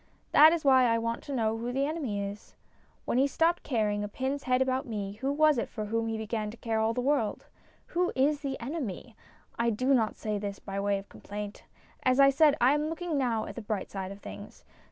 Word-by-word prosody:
That 310 +2 +8
is 330 -3 -1
why 260 -2 +6
I 230 -1 +3
want 230 0 -2
to - - -6
know 225 -4 0
who 240 +2 -3
the 270 +2 0
enemy 285 -9 -2
is. 200 +1 -8 0.5
When 245 - +1
he 275 - +4
stopped 330 +5 +1
caring 210 -5 0
a - - -2
pin's 265 +6 -3
head 255 0 +2
about 265 +1 0
me, 205 -4 -4
who 270 +1 0
was 305 -2 +4
it - - -3
for 215 -2 -5
whom 225 +2 -1
he 225 0 -2
began 220 -1 -3
to 225 - -10
care 225 -1 -1
all 220 +1 +1
the 250 - 0
world? 270 -5 0 0.5
Who 360 +1 +1
is 285 +3 +2
the 275 -3 -4
enemy? 245 - -5 0.4
I 235 0 +2
do 255 +5 +1
not 225 -4 +2
say 210 -1 -3
this 200 -1 -4
by 195 0 -5
way 200 0 +1
of 195 0 -9
complaint. 205 0 -8 0.4
As 255 +1 +2
I 275 0 +7
said, 290 +1 +4
I 250 +3 +5
am 295 +1 0
looking 330 0 -3
now 240 -5 0
at - - -7
the 235 - -7
bright 210 -2 -4
side 190 -1 -5
of 200 +1 -10
things. - - -10
240 Hz, 235 wpm, -29 LUFS, 215-275 Hz, 0.5 s, That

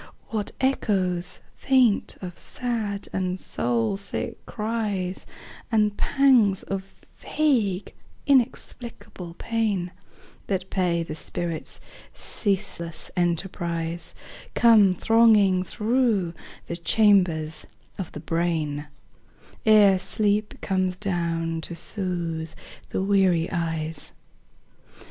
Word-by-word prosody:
What 215 -2 -2
echoes 190 -9 0
faint 255 -6 +2
of 180 -1 -6
sad 220 -5 -3
and 185 0 -1
soul 120 - -1
sick 200 - -5
cries, 210 -4 -2 0.4
And 210 -2 +3
pangs 245 -10 +3
of 195 0 -6
vague 225 -11 0 0.3
inexplicable 240 -8 -1
pain 210 -5 -1 0.6
That 190 -1 -2
pay 175 -3 +1
the 160 - -6
spirit's 165 +1 -4 0.4
ceaseless 190 -5 -2
enterprise, 170 -1 -2 0.4
Come 215 -6 +6
thronging 215 -4 +5
through 215 -2 +1 0.3
the 170 - -5
chambers 170 -4 +3 0.3
of 185 - -4
the - - -6
brain 160 -3 -1 0.8
Ere 205 -3 +7
sleep 210 +2 0
comes 185 -1 0
down 165 -4 -1
to 170 - -6
soothe 170 -4 -2 0.3
the 190 - -1
weary 190 -4 +3
eyes. 160 -3 -3
190 Hz, 90 wpm, -25 LUFS, 170-215 Hz, 0.8 s, Ere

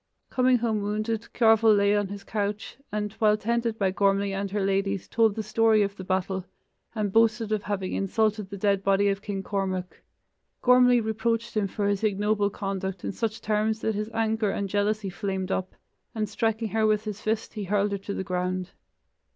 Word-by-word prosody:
Coming 255 0 +4
home 225 -3 0
wounded, 215 +2 -2
Cearbhail 225 -2 +5
lay 200 +1 +3
on 205 -1 +1
his 200 0 -8
couch, 210 0 -3 0.2
and 210 -1 -2
while 215 -1 +4
tended 230 +1 -1
by 195 -3 +1
Gormlai 200 0 +2
and 195 +1 -2
her 200 0 -1
ladies 195 -1 0
told 225 -3 +2
the 220 - -3
story 215 0 +3
of 200 0 -3
the 190 - -8
battle 190 0 -1 0.5
and 210 -3 -1
boasted 225 -1 +3
of 215 -2 +1
having 200 -3 -3
insulted 210 0 0
the 200 - -6
dead 200 0 +1
body 195 +1 +3
of 195 0 -1
King 200 -2 -4
Cormac. 190 -2 -3 0.6
Gormlai 250 -1 +5
reproached 230 +1 -1
him 210 -2 +1
for 200 +2 -2
his 200 +1 0
ignoble 205 0 +1
conduct 195 -2 -4
in - - -1
such 225 +2 -3
terms 215 +1 0
that 220 - 0
his 210 +1 -3
anger 220 -1 0
and 200 0 -2
jealousy 205 0 0
flamed 190 -1 -3
up, 185 0 -2 0.4
and 215 -1 -1
striking 225 +1 -1
her 220 0 +2
with 215 0 +2
his 210 -1 -5
fist 220 +1 -2
he 210 -3 -4
hurled 205 +1 +1
her 200 - -2
to 200 +1 -5
the - - -3
ground. 185 0 -2
210 Hz, 190 wpm, -26 LUFS, 195-220 Hz, 0.6 s, Cearbhail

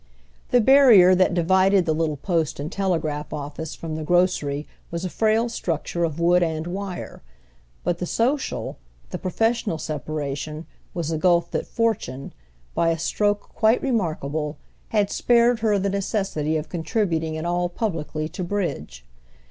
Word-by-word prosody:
The 245 - +4
barrier 230 -8 +7
that 185 -1 +3
divided 190 +2 +3
the 160 - +1
little 155 -2 -1
post 165 -1 -1
and 150 +4 -4
telegraph 160 -7 -1
office 150 +1 -5
from 165 -1 -6
the 155 0 -4
grocery 155 -4 +1 0.2
was 170 +2 -4
a 180 - -4
frail 220 +1 +2
structure 170 -5 -2
of 165 -1 -2
wood 175 +1 +4
and 160 -2 -1
wire; 185 +1 -6 0.6
but 175 -1 -1
the 180 - -3
social, 260 - -1 0.3
the - - -4
professional 225 0 0
separation 150 0 -4 0.3
was 165 -2 -2
a 160 - -1
gulf 175 0 +3
that - - -2
fortune, 205 - -2 0.4
by 165 - +2
a 165 - +1
stroke 205 +5 0
quite 220 +2 +2
remarkable, 155 - -1 0.3
had 205 -2 +1
spared 240 -1 +3
her 215 -2 +2
the 200 0 0
necessity 195 -6 -1
of 155 - -4
contributing 165 -2 -1
at 160 - -4
all 175 0 0
publicly 160 -6 -3
to 185 - -5
bridge. 125 - -3
175 Hz, 150 wpm, -23 LUFS, 155-200 Hz, 0.6 s, barrier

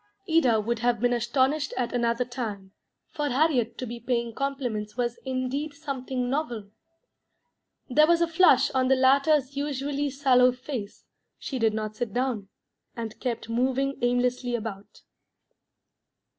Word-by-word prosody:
Ida 265 -9 +4
would 230 +2 -1
have 240 -1 +1
been 245 +2 +2
astonished 265 +5 +1
at 240 -2 -1
another 235 0 +1
time; 220 -6 -6 0.4
for 295 -1 -2
Harriet 255 -4 +1
to 255 - -4
be 235 0 -6
paying 235 -1 -1
compliments 245 -6 -3
was 240 -1 -1
indeed 265 +3 -2
something 265 -4 -3
novel. 240 -7 -3 1.2
There 305 +4 +5
was 340 0 +4
a 340 - +2
flush 330 -5 +4
on 260 -1 +1
the 265 - +5
latter's 275 +1 +3
usually 285 0 -2
sallow 255 -2 +4
face; 250 -5 -7 0.3
she 265 - -5
did 220 -2 +2
not 215 -1 -3
sit 235 -5 -3
down, 245 -5 -1 0.5
and 225 -2 -6
kept 235 -3 -3
moving 260 +4 0
aimlessly 245 0 +1
about. 210 -3 -7
250 Hz, 140 wpm, -26 LUFS, 235-275 Hz, 1.2 s, There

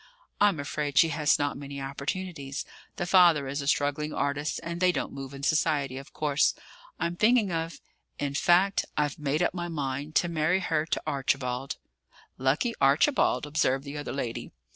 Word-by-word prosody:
"I'm 200 -6 +4
afraid 145 0 -3
she 165 - +6
has 150 -2 +2
not 145 -1 -2
many 140 0 -7
opportunities; 140 +1 -4 0.3
the 175 - -2
father 170 -6 +5
is 140 +2 -3
a 140 - -5
struggling 145 +1 +1
artist 145 +2 -1
and 170 +1 -5
they 180 0 +5
don't - - -3
move 135 -1 -7
in 140 0 -9
society, 145 -4 +1
of 135 - -12
course. 150 -1 +1 0.4
I'm 170 +1 -1
thinking 215 0 +3
of 165 0 -3 0.4
in 140 -1 -2
fact, 180 +6 +3
I've 145 0 0
made 150 +3 0
up - - +1
my 175 -1 -3
mind 145 -1 -4
to 175 - +3
marry 165 +2 +1
her 160 -4 0
to - - -1
Archibald." 135 -2 -1 0.6
"Lucky 140 - +1
Archibald!" 150 - +3
observed 145 -3 +1
the 140 0 -7
other 145 - -5
lady. 120 -4 -4
150 Hz, 170 wpm, -28 LUFS, 140-170 Hz, 0.6 s, she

